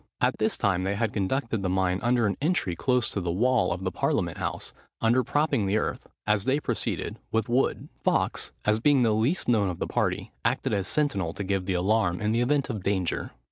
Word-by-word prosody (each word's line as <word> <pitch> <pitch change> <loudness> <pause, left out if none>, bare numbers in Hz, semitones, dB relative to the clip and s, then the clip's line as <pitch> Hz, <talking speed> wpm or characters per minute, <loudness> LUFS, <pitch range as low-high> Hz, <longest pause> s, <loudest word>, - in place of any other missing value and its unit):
At - - +1
this - - +1
time 95 -2 +1
they 100 +1 -1
had 110 0 -1
conducted 115 +2 -1
the 95 - -1
mine 95 0 +1
under 120 -1 +2
an 100 -2 0
entry 150 - 0
close 125 +6 +1
to 100 - -3
the 85 -1 -1
wall 120 +5 +2
of 90 +2 -3
the 95 - -1
parliament - - -1
house, - - -4 0.3
under 120 +3 +3
propping 145 -6 +1
the 100 +3 +2
earth, - - -3 0.2
as 105 -1 +1
they 135 +3 +2
proceeded, - - -3
with 115 -1 0
wood. 125 +3 0 0.2
Fawkes, - - 0
as 105 +1 +3
being 140 +1 +4
the 110 -2 +3
least 115 - +1
known 105 -5 +3
of 90 - -4
the - - -2
party, - - -1
acted - - 0
as 100 -2 0
sentinel 100 - 0
to 100 - -5
give 95 -1 -1
the 95 - 0
alarm 90 -1 +1
in 105 0 0
the 115 +2 +1
event 140 +2 +1
of 110 -7 -4
danger. 95 -2 -1
105 Hz, 220 wpm, -27 LUFS, 95-125 Hz, 0.3 s, being